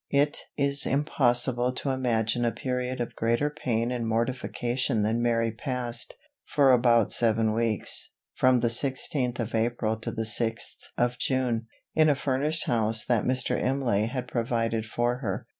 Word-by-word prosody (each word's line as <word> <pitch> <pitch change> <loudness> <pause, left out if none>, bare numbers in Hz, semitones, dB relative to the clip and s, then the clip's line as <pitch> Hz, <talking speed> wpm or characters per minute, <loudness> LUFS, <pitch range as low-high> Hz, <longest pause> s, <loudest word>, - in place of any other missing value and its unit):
It 145 +1 +2 0.2
is 140 -1 +1
impossible 125 -3 +2
to 135 +2 -1
imagine 120 -3 0
a 120 - +2
period 125 +2 -3
of 120 - -4
greater 120 +6 +1
pain 120 -5 -1
and 120 -2 -2
mortification 120 0 -1
than 115 +3 +1
Mary 115 -1 +1
passed, 120 -1 -4 0.3
for 140 -3 +3
about 120 -3 +4
seven 110 -1 +2
weeks, 115 -1 -1 0.2
from 130 -1 +3
the 120 - +2
sixteenth 130 0 -1
of 115 0 -3
April 110 -1 0
to 110 - -5
the 115 -1 -3
sixth 115 0 -1 0.2
of 120 0 0
June, 125 -4 0 0.3
in 155 -1 +4
a 145 - +4
furnished 145 +4 0
house 110 -1 0
that 120 -3 +1
Mr. 130 0 +1
Imlay 125 -6 +1
had 125 +1 -4
provided 115 -2 -1
for 120 +2 0
her. 100 -8 -3
120 Hz, 155 wpm, -27 LUFS, 115-130 Hz, 0.3 s, about